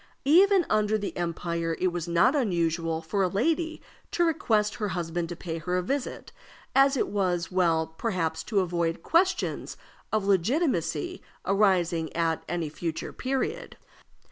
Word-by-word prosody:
Even 370 +4 +5
under 215 0 +2
the 205 -1 -5
Empire 170 -1 -2
it 185 - +2
was 175 -1 -4
not 170 - +3
unusual 165 - 0
for 195 +5 -1
a 190 - +3
lady 320 - -1 0.3
to 345 - +1
request 220 -10 +1
her 210 - -1
husband 170 -2 -3
to 175 - -5
pay 165 -1 -5
her 180 +3 -1
a 180 - 0
visit, 270 +7 -3 0.4
as 275 0 +5
it - - +1
was 185 -4 -1
well, 170 -3 +2
perhaps, 160 -2 -2
to 205 -3 +1
avoid 170 -2 -1
questions 370 +3 +1 0.3
of 215 -2 0
legitimacy 245 - 0 0.2
arising 180 -5 +2
at 165 -1 0
any 170 -2 -1
future 160 +2 -5
period. 270 - -3
185 Hz, 145 wpm, -27 LUFS, 170-245 Hz, 0.4 s, Even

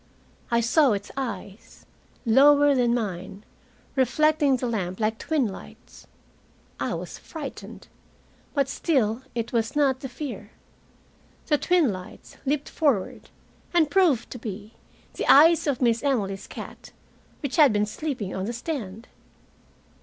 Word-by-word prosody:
I 235 -1 +2
saw 255 +2 +4
its 200 0 -5
eyes, 210 -6 -7 0.4
lower 285 +4 +6
than 245 -2 +2
mine, 195 -3 -4 0.5
reflecting 290 +1 +3
the 250 - -3
lamp 190 -5 -3
like 220 0 0
twin 300 -7 0
lights. 195 - -12 0.7
I - - -1
was - - -7
frightened, 305 -4 -9 0.7
but 280 -2 +2
still 260 -6 0
it 230 0 -3
was 230 +3 0
not 275 -3 +2
the 265 -1 -6
fear. 235 -7 -7 0.9
The 295 -2 +2
twin 350 - +3
lights 185 0 -11
leaped 290 +1 0
forward 275 - -1 0.5
and 315 -4 +3
proved 340 - +2
to 245 - -7
be 210 0 -7 0.4
the - - +2
eyes 320 +3 +6
of 270 -3 0
Miss 235 -1 +2
Emily's 205 -9 -1
cat, - - -10 0.5
which 285 +2 -3
had 295 -5 +7
been 210 0 +1
sleeping 225 -3 -4
on 190 - -3
the 235 - -3
stand! 235 - -5
245 Hz, 135 wpm, -25 LUFS, 215-290 Hz, 0.9 s, had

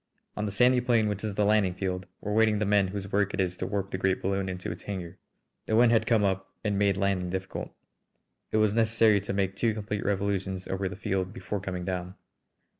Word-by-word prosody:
On 105 0 -2
the - - -3
sandy 125 +4 +4
plain 120 -3 +2
which 105 0 -3
is 105 -2 -3
the 105 - +2
landing 100 -3 +3
field 95 0 -3
were 105 - -3
waiting 110 -1 +4
the 105 - 0
men 100 -1 +3
whose 100 +1 -5
work 100 -1 +1
it - - -7
is 90 -1 0
to - - -3
warp 100 -1 -2
the 95 - -3
great 95 -1 +1
balloon 95 0 -1
into 90 0 -4
its - - -8
hangar. 95 -2 -6 0.5
The 110 - +1
wind 115 +1 +6
had 110 -1 +3
come 115 -3 +3
up 95 -1 0
and 105 -2 0
made 100 -1 +2
landing 95 -2 0
difficult. 95 +1 -4 0.8
It - - +2
was 110 -1 +3
necessary 110 -2 +4
to 100 - -4
make 95 -1 0
two 110 +1 +1
complete 105 -1 -3
revolutions 95 -2 -1
over 95 0 -2
the 100 - -7
field 95 -1 -2
before 105 -3 -4
coming 90 -2 -4
down. 90 0 -4
100 Hz, 225 wpm, -28 LUFS, 95-105 Hz, 0.8 s, wind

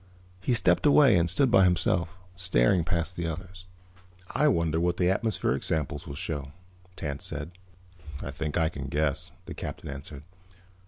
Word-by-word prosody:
He 120 +6 +1
stepped 90 - +3
away 140 -6 +6
and 85 -1 +2
stood 125 - +3
by 95 - +6
himself, 85 -1 +2 0.3
staring 90 -3 +3
past 85 +1 -1
the 85 -2 -2
others. 90 +3 -7 0.6
"I 150 - +2
wonder 85 - +2
what 85 +1 0
the 90 0 +3
atmospheric 95 - 0
sample 75 -2 -2
will 70 - -6
show," 70 -1 -4 0.4
Tance 70 -4 -5
said. 75 +4 -4 0.7
"I - - -5
think 75 0 -3
I 80 -2 +2
can 70 -4 -6
guess," 75 +4 0 0.2
the - - -7
Captain - - -7
answered. 70 +1 -8
85 Hz, 160 wpm, -28 LUFS, 75-90 Hz, 0.7 s, away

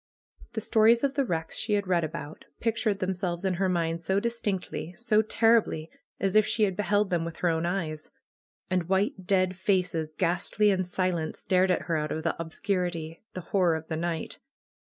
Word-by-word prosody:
The 220 - -2
stories 225 +3 +4
of 275 -1 +2
the 280 - +1
wrecks 165 -8 -3
she 215 - -1
had 205 -1 +1
read 180 -2 +2
about, 155 -1 -6
pictured 225 -2 0
them 190 0 -1
selves 180 -1 -3
in 190 - +2
her 185 +1 0
mind 165 -2 0
so 190 +3 +1
distinctly, 205 -6 -3
so 225 -3 +3
terribly, 220 -7 +2 0.3
as 195 +1 0
if 215 - +7
she 220 - +2
had 195 -3 +2
beheld 205 0 +1
them 170 -2 +1
with 165 0 -5
her 175 - +1
own 165 +1 0
eyes. 160 -4 -3 0.6
And 180 -2 -1
white 190 -1 0
dead 185 -1 +2
faces, 180 -4 0
ghastly 185 +5 +1
and 185 -2 0
silent, 180 -3 -1
stared 185 0 +2
at 180 - +1
her 165 +1 0
out 150 0 -2
of 160 - -3
the 165 - 0
ob 165 -1 -4
scurity, 170 -3 -2 0.2
the 185 - -4
horror 175 -2 +2
of 160 0 -7
the 160 - -1
night. 165 0 -3
185 Hz, 195 wpm, -28 LUFS, 165-205 Hz, 0.6 s, if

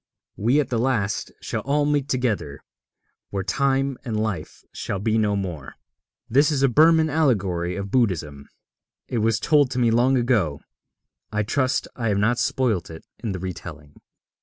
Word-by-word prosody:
We 120 +8 +2
at 145 - 0
the 120 - 0
last 115 -5 -1
shall - - -3
all 145 +2 +1
meet 145 -2 0
together 100 - -2 0.7
where 100 -1 -3
Time 135 +3 0
and 115 -4 -2
Life 100 -8 -4
shall 100 - -4
be 110 +3 0
no 105 -1 +1
more. 90 -8 -5 0.5
This 140 +6 +3
is 140 -2 0
a - - +6
Burman 160 +4 +5
allegory 100 - 0
of 100 0 -5
Buddhism. 80 - -1 0.6
It 120 - -2
was 110 0 +1
told 145 -4 +3
me 120 -2 +3
long 125 +3 +3
ago. 110 - +1 0.7
I 105 0 0
trust 130 +5 0
I 115 -2 -2
have 100 -2 +1
not 115 +4 +2
spoilt 130 -8 0
it 80 0 -10
in 115 - -3
the 95 - -3
retelling. 80 -5 -8
115 Hz, 160 wpm, -23 LUFS, 95-135 Hz, 0.7 s, a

